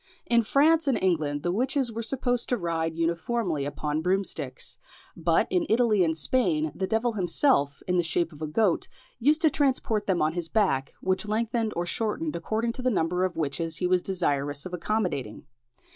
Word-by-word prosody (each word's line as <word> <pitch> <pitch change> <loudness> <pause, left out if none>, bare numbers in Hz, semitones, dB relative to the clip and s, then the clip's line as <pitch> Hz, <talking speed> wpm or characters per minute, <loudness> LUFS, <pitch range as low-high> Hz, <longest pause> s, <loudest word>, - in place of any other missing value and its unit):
In 235 0 +4
France 305 +7 +3
and 270 - +3
England 155 -6 0
the 175 - 0
witches 255 +4 +1
were 230 +1 -4
supposed 245 0 -1
to 245 - +1
ride 165 -3 -2
uniformly 170 -1 -1
upon 150 +2 -2
broomsticks; 190 +3 -2 0.4
but - - +2
in 350 -3 +1
Italy 220 -4 +3
and 160 -1 0
Spain, 160 - +1
the 190 - -3
devil 225 +2 0
himself, 175 - +1
in 180 0 +1
the 175 - +3
shape 170 0 +1
of 150 - -14
a 155 - -2
goat, 180 +3 +1 0.3
used 300 +6 +3
to 315 - +5
transport 255 -7 0
them 185 -3 +1
on 155 +1 +1
his 170 -1 -3
back, 160 -11 +1
which 190 +2 0
lengthened 225 +1 0
or 175 - -1
shortened 175 -5 -2
according 220 +7 -1
to 255 - -7
the 255 - +1
number 180 -4 0
of 185 - -3
witches 160 +2 -2
he 180 - -1
was 180 0 +3
desirous 145 -6 -1
of 185 - -7
accommodating. 175 - -2
185 Hz, 185 wpm, -27 LUFS, 165-230 Hz, 0.4 s, to